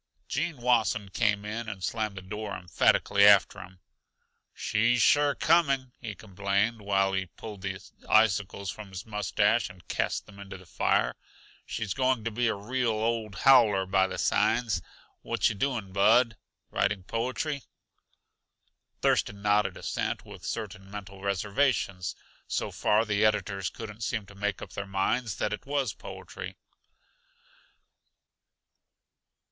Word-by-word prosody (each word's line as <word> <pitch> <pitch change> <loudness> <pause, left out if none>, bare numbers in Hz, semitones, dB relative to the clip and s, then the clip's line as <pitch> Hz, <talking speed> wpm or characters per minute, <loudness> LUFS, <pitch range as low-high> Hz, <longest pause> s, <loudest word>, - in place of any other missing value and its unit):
Gene 155 +3 -2
Wasson 115 -4 +1
came 105 0 +1
in 110 +2 -4
and 95 -4 -7
slammed 110 +1 -2
the 95 - -7
door 105 +2 -5
emphatically 90 +2 +2
shut 100 - +10
after 100 -1 +5
him. 95 0 -12 0.7
"She's 120 +3 +1
sure 145 +5 +4
coming," 140 -6 +2
he 110 -3 -5
complained, 100 +3 -1
while 95 -1 +1
he 95 -1 -1
pulled 105 +2 -10
the 95 0 -4 0.3
icicles 100 -2 +2
from 105 -2 -10
his 95 +3 -7
mustache 105 0 +1
and 90 -4 -15
cast - - -1
them 100 -1 -15
into 95 -1 -8
the 95 - -15
fire. - - +1 0.5
"She's 105 -4 -3
going 130 -2 +1
to 115 - -2
be 120 +2 0
a 110 - +1
real, 120 +4 -1
old 110 -1 -1
howler 115 -8 +6
by 95 0 +3
the - - -6
signs. 115 -4 +1 0.4
What - - +1
yuh - - -4
doing, 110 -4 -2
Bud? 110 +4 +4 0.4
Writing 100 -1 0
poetry?" 125 - -2 1.4
Thurston 100 0 +1
nodded 105 0 +2
assent - - -3
with - - -12
certain 95 -2 -5
mental 100 -1 -9
reservations; 100 -1 0 0.3
so - - -2
far 110 +2 +2
the 105 -1 +1
editors 100 -3 +1
couldn't 110 -1 -9
seem 110 0 -2
to 100 - -14
make 105 0 -3
up - - -10
their 100 -1 -5
minds 95 +3 0
that - - -1
it 135 +6 -7
was 140 -6 0
poetry. - - -8
105 Hz, 140 wpm, -28 LUFS, 100-115 Hz, 1.4 s, shut